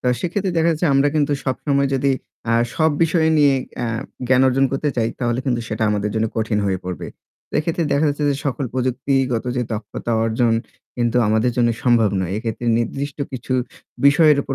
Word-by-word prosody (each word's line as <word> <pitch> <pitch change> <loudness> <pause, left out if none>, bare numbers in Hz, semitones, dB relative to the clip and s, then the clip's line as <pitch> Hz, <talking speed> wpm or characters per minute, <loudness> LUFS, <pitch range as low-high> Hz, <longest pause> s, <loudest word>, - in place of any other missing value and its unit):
তো - - -5
সেক্ষেত্রে 185 +2 -1
দেখা 165 0 +3
যাচ্ছে 165 +2 0
আমরা 135 +1 +4
কিন্তু 145 -1 +2
সবসময় 140 +1 0
যদি 135 +1 +1 0.4
আ - - +3 0.2
সব 160 0 +3
বিষয় 165 0 +2
নিয়ে 145 -2 +5 0.3
আ - - -1 0.4
জ্ঞান 130 0 +5
অর্জন 135 +1 +3
করতে 145 +2 0
চাই 115 -2 +1
তাহলে 120 -1 -1
কিন্তু 120 -3 +1
সেটা 110 0 -3
আমাদের 105 0 -1
জন্য 110 0 +1
কঠিন 110 -1 0
হয়ে 95 -1 0
পড়বে। 90 -1 -5 0.5
এক্ষেত্রে 165 +2 -1
দেখা 145 +2 +2
যাচ্ছে 145 +1 -1
যে - - +1
সকল 140 0 -1
প্রযুক্তিগত 130 -1 0
যে 125 - +1
দক্ষতা 110 +2 -4
অর্জন 115 +1 +1 0.4
কিন্তু 120 -1 0
আমাদের 110 +3 +2
জন্য 120 -1 +3
সম্ভব 115 -4 +4
নয়। 90 -1 -2
এক্ষেত্রে 115 +1 -4
নির্দিষ্ট 140 +5 -3
কিছু 130 0 -4 0.5
বিষয়ের 150 +1 +6
উপর 135 - -4
130 Hz, 180 wpm, -20 LUFS, 115-145 Hz, 0.5 s, বিষয়ের